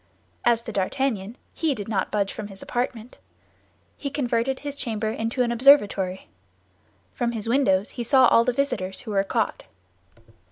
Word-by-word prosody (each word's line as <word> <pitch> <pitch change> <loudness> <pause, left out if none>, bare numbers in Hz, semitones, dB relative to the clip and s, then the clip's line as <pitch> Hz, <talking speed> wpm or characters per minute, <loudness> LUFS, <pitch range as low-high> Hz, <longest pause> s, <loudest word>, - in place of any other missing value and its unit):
As 235 -1 +3
to 230 - -6
D'Artagnan, 215 +1 -2 0.2
he 315 -4 0
did 205 -4 -6
not 215 -3 -1
budge 200 -2 0
from 215 - -6
his 195 -1 -9
apartment. 245 -1 -4 0.8
He 280 - -4
converted 260 -1 -1
his 290 -1 -5
chamber 220 -5 -2
into 230 +3 -1
an 240 - -1
observatory. 205 -7 +4 0.9
From 235 -1 -1
his 225 -1 -4
windows 225 -6 +2
he 240 - -5
saw 260 +2 +5
all 230 - +5
the 250 - +1
visitors 240 -8 -1
who 220 - -7
were 195 -1 +2
caught. 195 - -1
230 Hz, 160 wpm, -24 LUFS, 205-255 Hz, 0.9 s, saw